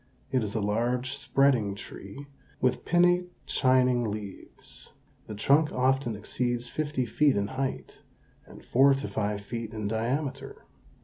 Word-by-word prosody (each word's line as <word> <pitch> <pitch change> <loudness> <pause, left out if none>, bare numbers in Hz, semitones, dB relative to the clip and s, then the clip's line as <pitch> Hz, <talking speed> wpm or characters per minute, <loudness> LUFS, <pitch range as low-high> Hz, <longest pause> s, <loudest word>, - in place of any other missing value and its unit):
It 130 -2 +2
is 105 0 -4
a 110 - 0
large, 120 +5 0
spreading 135 -7 +2
tree, 100 +6 -10 0.3
with 130 -1 0
pinnate, 175 +1 +3 0.2
shining 125 -2 +3
leaves. 105 -2 -9 0.3
The 105 - -6
trunk 145 +8 +3
often 130 -2 +1
exceeds 120 +3 -2
fifty 150 -4 -2
feet 140 +5 +2
in 100 +1 -1
height, 130 0 -4 0.5
and - - -14
four 135 +2 +5
to 135 - -4
five 105 -1 -2
feet 115 +1 -6
in 105 -1 -3
diameter. 130 +6 -3
125 Hz, 135 wpm, -28 LUFS, 110-135 Hz, 0.5 s, four